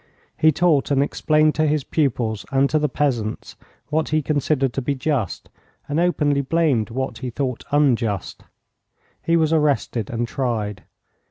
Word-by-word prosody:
He 155 - +4
taught 155 -3 +2
and 140 -1 +3
explained 155 +1 +2
to 155 0 +1
his 150 -1 +1
pupils 120 -9 -1
and 135 0 +3
to 155 - +3
the 150 0 0
peasants 120 -7 -2 0.3
what 155 +1 0
he 155 0 +1
considered 140 -3 0
to 135 - -2
be 140 +2 -1
just, 130 - -2 0.4
and 145 +2 -1
openly 150 -5 +2
blamed 140 -6 +1
what 130 +3 -4
he 130 - -4
thought 125 0 -3
unjust. 120 -8 0 0.8
He 165 0 +2
was 160 -1 +2
arrested 145 -8 0
and 120 0 -2
tried. 110 -7 -3
140 Hz, 155 wpm, -22 LUFS, 120-155 Hz, 0.8 s, He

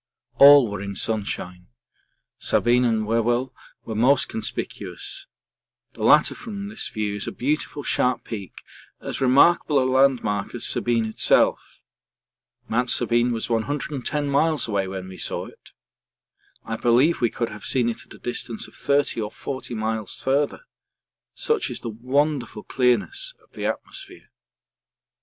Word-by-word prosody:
All 140 -2 +9
were 100 -1 -5
in 100 0 -5
sunshine; 95 -4 -3 0.7
Sabine 125 +1 +2
and 110 -2 +1
Whewell 120 +3 0 0.3
were 110 - -5
most 130 +5 +3
conspicuous 390 - -4 0.7
the - - -11
latter - - +5
from 205 -3 -7
this 215 - -2
view 105 -2 -3
is 105 - -4
a - - -2
beautiful 145 +2 -2
sharp 125 -2 +1
peak, 100 -5 -8 0.4
as - - -5
remarkable 145 +4 +4
a 130 - +2
landmark 130 -6 +1
as 120 - -4
Sabine 115 -2 +1
itself. 110 - +1 0.8
Mount 125 +2 0
Sabine 120 0 +2
was 115 -1 -2
110 145 +4 -2
miles 150 +1 +1
away 100 -3 -1
when 95 -1 -6
we 95 0 -10
saw - - -2
it. - - -15 1.0
I - - -3
believe 125 +8 +3
we 120 - +3
could 115 0 -3
have 105 -1 -10
seen 125 -3 +1
it 115 - -3
at - - -16
a - - -14
distance 120 -2 -5
of - - -18
30 140 -4 0
or 105 - -3
40 130 +1 -6
miles 110 -2 -3
farther 140 - 0 0.7
such 450 -3 0
is - - -5
the 115 - -4
wonderful 125 0 -1
clearness 395 - 0
of - - -29
the - - -3
atmosphere. 385 -1 -7
125 Hz, 145 wpm, -23 LUFS, 110-145 Hz, 1.0 s, All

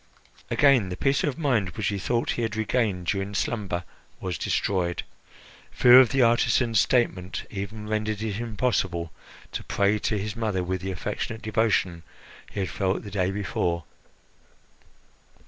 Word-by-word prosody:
Again 135 -9 +4
the 90 - -5
peace 135 +5 +1
of 145 -4 -1
mind 125 - +1
which 105 - 0
he 100 -1 -2
thought 120 +4 0
he - - -2
had 115 -2 -2
regained 110 -4 0
during 100 +2 -2
slumber 95 -6 -2 0.4
was 90 -3 -4
destroyed. 90 -3 0 0.7
Fear 125 +1 +8
of 130 -3 +6
the 135 +1 +3
artisan's 115 -1 +3
statement 95 -6 +1
even 105 +1 -6
rendered 110 0 -2
it 105 -1 -3
impossible 100 -8 -1 0.4
to - - -4
pray 100 +1 +1
to 105 - -1
his 105 +2 -4
mother 105 -5 -1
with 90 0 -2
the 95 - -4
affectionate 105 +4 -4
devotion 105 -5 +1 0.5
he 100 - -3
had 95 - -2
felt 95 0 -1
the 100 - -8
day 95 -2 0
before. 90 -4 -1
105 Hz, 150 wpm, -26 LUFS, 95-115 Hz, 0.7 s, Fear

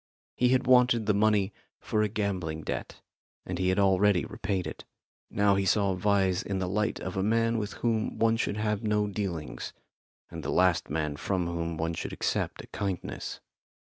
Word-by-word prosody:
He 125 - +3
had 130 0 +3
wanted 125 -3 +5
the 105 - +3
money 105 -1 +2 0.3
for 105 - 0
a 105 - +3
gambling 95 -7 -2
debt, - - -5 0.4
and 90 -1 -4
he 95 0 +2
had 95 - +1
already 100 -1 +4
repaid 95 -3 -2
it. - - -7 0.5
Now 100 0 +3
he 100 0 +1
saw 100 0 +2
Vyse 95 -1 +2
in 100 - -2
the 95 -1 -1
light 105 +3 0
of 95 - -5
a - - +2
man 115 +2 +2
with 105 -1 -4
whom 115 -2 -1
one 115 0 +3
should 105 -2 -1
have 105 -1 0
no 105 -2 +1
dealings, 95 -6 -4 0.6
and - - -6
the - - -3
last 90 -2 +2
man 75 0 -2
from 90 +1 -1
whom 85 -1 -3
one 80 +1 -1
should - - -5
accept - - -2
a - - -13
kindness. 95 -4 -4
100 Hz, 185 wpm, -29 LUFS, 90-105 Hz, 0.6 s, wanted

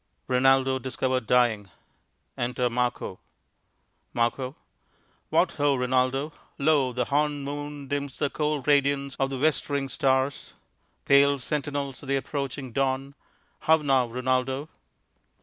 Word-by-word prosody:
_ - - -48 0.2
Rinaldo 130 +1 +3
discovered 130 -1 -2
dying. 115 -5 +2 0.7
Enter 125 +1 -1
Marco_._ 120 -6 -2 1.0
Mar. 120 0 +3 1.0
What - - +3
ho, 145 -1 +1
Rinaldo! 130 +3 0 0.2
Lo, 140 -3 +2
the 125 0 -1
hornéd 145 +1 0
moon 145 0 -6
Dims 140 -1 -3
the 145 -2 -1
cold 150 -3 -2
radiance 140 -1 +2
of 135 0 +1
the 135 - -4
westering 140 -1 0
stars, 130 +1 0 0.5
Pale 140 +1 +5
sentinels 140 0 -3
of 140 - -10
the 140 - +2
approaching 135 -1 -4
dawn. 135 +2 -1 0.5
How 160 0 +4
now, 135 -5 +2
Rinaldo? 130 +4 -1
135 Hz, 120 wpm, -26 LUFS, 130-145 Hz, 1.0 s, Pale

